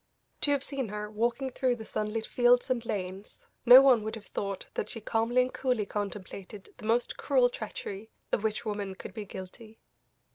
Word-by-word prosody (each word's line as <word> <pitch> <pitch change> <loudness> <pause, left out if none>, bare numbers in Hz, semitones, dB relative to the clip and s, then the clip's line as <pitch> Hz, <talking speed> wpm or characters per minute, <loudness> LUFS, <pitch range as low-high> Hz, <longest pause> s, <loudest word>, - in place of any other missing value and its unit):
To - - +3
have 285 -1 +2
seen 275 -4 -3
her 210 0 -5
walking 235 +5 -1
through 250 -1 +1
the 220 -2 -9
sunlit 215 +1 -2
fields 245 +1 +3
and 240 -3 0
lanes, 190 -2 -5 0.2
no 255 +2 +11
one 255 -5 +6
would 220 +1 -4
have 215 -2 -10
thought 195 -2 -4
that - - -3
she 225 - -5
calmly 230 +3 +2
and 255 - -5
coolly 250 -5 0
contemplated 200 -1 -6
the 215 - -7
most 235 +2 +1
cruel 255 -4 +3
treachery 215 -1 -6 0.2
of - - +1
which 220 +1 -1
woman 205 -3 -3
could - - -9
be 215 -2 -6
guilty. 210 +4 -10
220 Hz, 185 wpm, -29 LUFS, 205-245 Hz, 0.2 s, no